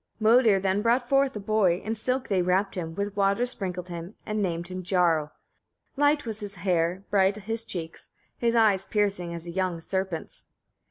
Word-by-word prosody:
31. 220 Hz, +1 st, +4 dB
Modir 205 Hz, -4 st, +4 dB
then 190 Hz, +1 st, 0 dB
brought 240 Hz, +2 st, +2 dB
forth 275 Hz, -1 st, +2 dB
a -, -, -3 dB
boy: 200 Hz, -4 st, +2 dB
in 220 Hz, -, -1 dB
silk 255 Hz, +4 st, 0 dB
they 190 Hz, -3 st, +1 dB
wrapped 185 Hz, +3 st, +1 dB
him, 165 Hz, -3 st, -5 dB
with 200 Hz, +1 st, -3 dB
water 200 Hz, +4 st, +2 dB
sprinkled 185 Hz, -7 st, -4 dB
him, 175 Hz, +3 st, -7 dB
and 215 Hz, 0 st, -2 dB
named 170 Hz, -3 st, -2 dB
him 185 Hz, 0 st, -5 dB
Jarl. 170 Hz, -4 st, +1 dB, 0.6 s
Light 290 Hz, 0 st, +2 dB
was 220 Hz, -2 st, -4 dB
his 205 Hz, -2 st, -7 dB
hair, 175 Hz, 0 st, 0 dB
bright 195 Hz, 0 st, +3 dB
his 225 Hz, +2 st, -2 dB
cheeks, 170 Hz, -6 st, -7 dB, 0.3 s
his 235 Hz, -1 st, 0 dB
eyes 210 Hz, -4 st, +3 dB
piercing 200 Hz, -5 st, 0 dB
as 170 Hz, 0 st, -7 dB
a 170 Hz, -, -6 dB
young 185 Hz, -1 st, -1 dB
serpent's. 190 Hz, -1 st, -4 dB
195 Hz, 185 wpm, -26 LUFS, 180-220 Hz, 0.6 s, 31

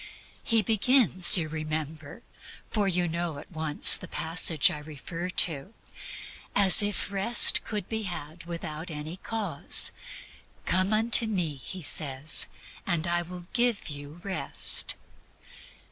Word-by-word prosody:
He 225 Hz, -2 st, 0 dB
begins, 220 Hz, -4 st, +4 dB
you 165 Hz, -3 st, -3 dB
remember 155 Hz, +3 st, -8 dB, 0.5 s
for 210 Hz, -3 st, -2 dB
you 180 Hz, -1 st, -1 dB, 0.3 s
at 150 Hz, -, -14 dB
once 155 Hz, -2 st, +5 dB
know -, -, -20 dB
the -, -, -10 dB
passage 160 Hz, -3 st, +2 dB
I 150 Hz, -, -8 dB
refer 160 Hz, +4 st, -9 dB
to 175 Hz, -3 st, +3 dB
almost 140 Hz, +10 st, -14 dB, 0.8 s
as 200 Hz, 0 st, +7 dB
if 205 Hz, -1 st, -4 dB
Rest 200 Hz, +4 st, +2 dB
could 210 Hz, -4 st, -7 dB
be 220 Hz, -1 st, -5 dB
had 170 Hz, -4 st, -9 dB
without 165 Hz, 0 st, -8 dB
any 155 Hz, +2 st, -9 dB
cause; 200 Hz, -9 st, +1 dB, 0.7 s
"Come 185 Hz, +2 st, -1 dB
unto 225 Hz, +1 st, +5 dB
me," 180 Hz, -8 st, -4 dB
He 175 Hz, +7 st, -11 dB
says, 145 Hz, 0 st, 0 dB, 0.4 s
"and 170 Hz, -3 st, -1 dB
I 175 Hz, 0 st, -2 dB
will 175 Hz, 0 st, -11 dB
give 240 Hz, -6 st, -2 dB
you 145 Hz, +2 st, -12 dB
Rest." 195 Hz, -2 st, -1 dB
175 Hz, 130 wpm, -25 LUFS, 155-200 Hz, 0.8 s, as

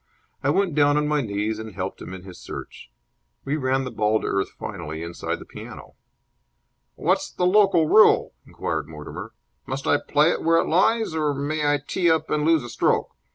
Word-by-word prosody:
I -, -, 0 dB
went 195 Hz, -4 st, +1 dB
down 145 Hz, 0 st, +4 dB
on 150 Hz, 0 st, +1 dB
my 150 Hz, -1 st, +1 dB
knees 105 Hz, -1 st, -2 dB
and 110 Hz, -3 st, -8 dB
helped 95 Hz, 0 st, -5 dB
him -, -, -8 dB
in 95 Hz, -1 st, -8 dB
his 95 Hz, -2 st, -11 dB
search. -, -, -9 dB, 0.6 s
We 140 Hz, +2 st, 0 dB
ran 135 Hz, -2 st, 0 dB
the 125 Hz, -, -5 dB
ball 110 Hz, 0 st, +1 dB
to -, -, -5 dB
earth 95 Hz, 0 st, 0 dB
finally 85 Hz, -5 st, -7 dB
inside 85 Hz, 0 st, -4 dB
the -, -, -12 dB
piano. -, -, -11 dB, 1.0 s
"What's -, -, 0 dB
the 180 Hz, -, -1 dB
local 190 Hz, -3 st, +4 dB
rule?" 215 Hz, +6 st, +5 dB
inquired -, -, -3 dB
Mortimer. 75 Hz, -1 st, -9 dB, 0.3 s
"Must 135 Hz, +1 st, -4 dB
I 145 Hz, -, +4 dB
play 150 Hz, +3 st, +3 dB
it -, -, -2 dB
where 165 Hz, 0 st, +4 dB
it -, -, +2 dB
lies, 220 Hz, +4 st, +2 dB
or 150 Hz, -2 st, 0 dB
may 145 Hz, +1 st, 0 dB
I 145 Hz, -, +3 dB
tee 175 Hz, -2 st, +1 dB
up 160 Hz, -1 st, +1 dB
and 150 Hz, -1 st, +1 dB
lose 160 Hz, -3 st, +3 dB
a 120 Hz, -, -8 dB
stroke? 115 Hz, -, +1 dB
145 Hz, 200 wpm, -24 LUFS, 105-160 Hz, 1.0 s, rule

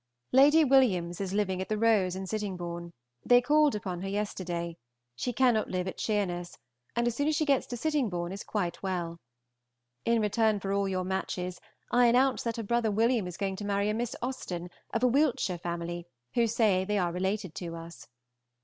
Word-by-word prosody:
Lady 295 Hz, +4 st, +6 dB
Williams 200 Hz, -11 st, +3 dB
is 190 Hz, -2 st, -3 dB
living 190 Hz, -2 st, 0 dB
at 190 Hz, -, -5 dB
the 215 Hz, -, 0 dB
Rose 210 Hz, -5 st, +3 dB
at 190 Hz, 0 st, -5 dB
Sittingbourne; 175 Hz, -5 st, -4 dB, 0.3 s
they 245 Hz, 0 st, +6 dB
called 295 Hz, +1 st, +3 dB
upon 185 Hz, -4 st, -4 dB
her 195 Hz, -, -4 dB
yesterday; 180 Hz, -4 st, -3 dB, 0.4 s
she 245 Hz, -, -2 dB
cannot 245 Hz, -2 st, +3 dB
live 185 Hz, 0 st, -2 dB
at 185 Hz, -, -6 dB
Sheerness, 180 Hz, -5 st, -1 dB, 0.4 s
and 235 Hz, 0 st, +1 dB
as 240 Hz, -, +1 dB
soon 285 Hz, +4 st, 0 dB
as 310 Hz, -, +2 dB
she 310 Hz, -, +1 dB
gets 275 Hz, -3 st, +2 dB
to 245 Hz, -, -5 dB
Sittingbourne 225 Hz, -, -1 dB
is 195 Hz, +1 st, -6 dB
quite 180 Hz, -5 st, -2 dB
well. 175 Hz, -3 st, -3 dB, 0.8 s
In 230 Hz, 0 st, +2 dB
return 215 Hz, 0 st, +2 dB
for 195 Hz, 0 st, -2 dB
all 200 Hz, -1 st, +1 dB
your 185 Hz, -1 st, -1 dB
matches, 180 Hz, -1 st, -3 dB, 0.3 s
I 245 Hz, 0 st, +5 dB
announce 255 Hz, +3 st, +3 dB
that 230 Hz, -1 st, -3 dB
her 230 Hz, -, -3 dB
brother 235 Hz, +1 st, +1 dB
William 225 Hz, -1 st, +2 dB
is 180 Hz, 0 st, -7 dB
going 195 Hz, -1 st, -2 dB
to 205 Hz, -, -6 dB
marry 200 Hz, 0 st, 0 dB
a -, -, +1 dB
Miss 230 Hz, +1 st, -2 dB
Austen, 180 Hz, -9 st, -4 dB, 0.2 s
of 230 Hz, -, -1 dB
a -, -, +6 dB
Wiltshire 245 Hz, -, +1 dB
family, 175 Hz, 0 st, -4 dB, 0.3 s
who 235 Hz, -1 st, +3 dB
say 215 Hz, -5 st, +2 dB
they 210 Hz, +2 st, -1 dB
are 175 Hz, -3 st, +1 dB
related 190 Hz, 0 st, -2 dB
to 170 Hz, -2 st, -5 dB
us. 165 Hz, 0 st, -10 dB
200 Hz, 195 wpm, -29 LUFS, 180-235 Hz, 0.8 s, Lady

